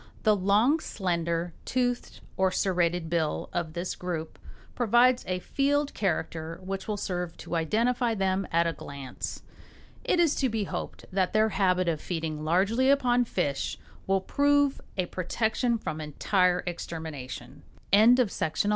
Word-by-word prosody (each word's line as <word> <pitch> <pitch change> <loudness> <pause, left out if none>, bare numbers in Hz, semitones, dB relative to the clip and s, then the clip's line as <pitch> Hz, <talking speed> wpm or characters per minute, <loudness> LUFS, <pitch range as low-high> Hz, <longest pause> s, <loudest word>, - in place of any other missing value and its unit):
The 215 -2 +5
long, 210 - +3
slender, 170 - -2
toothed 245 -1 -1
or 190 0 +3
serrated 175 -3 0
bill 160 -2 -1
of 170 -3 -2
this 175 +2 -3
group 170 -3 -5 0.3
provides 245 +2 +4
a 185 0 0
field 285 +8 0
character 165 -3 -2
which 195 0 -4
will 210 -1 -1
serve 180 -3 -3
to 175 - -5
identify 230 +8 +1
them 195 -1 0
at 170 +1 +3
a 165 - 0
glance. 140 -5 -7 0.6
It 355 - +1
is 330 -4 +4
to 265 - +2
be 220 -2 -1
hoped - - -5
that 185 -1 0
their 215 +1 +4
habit 185 -2 +2
of 160 -3 0
feeding 160 -3 -3
largely 200 +11 +2
upon 245 -3 +3
fish 145 -10 -2 0.3
will 195 0 +2
prove 285 +4 +2 0.2
a 185 - +1
protection 220 +7 0
from 155 -7 -5
entire 180 +4 +1
extermination. 160 -6 -6 0.3
THE 235 +5 +6
TRUMPETERS. 170 -3 -1
190 Hz, 145 wpm, -28 LUFS, 170-235 Hz, 0.6 s, THE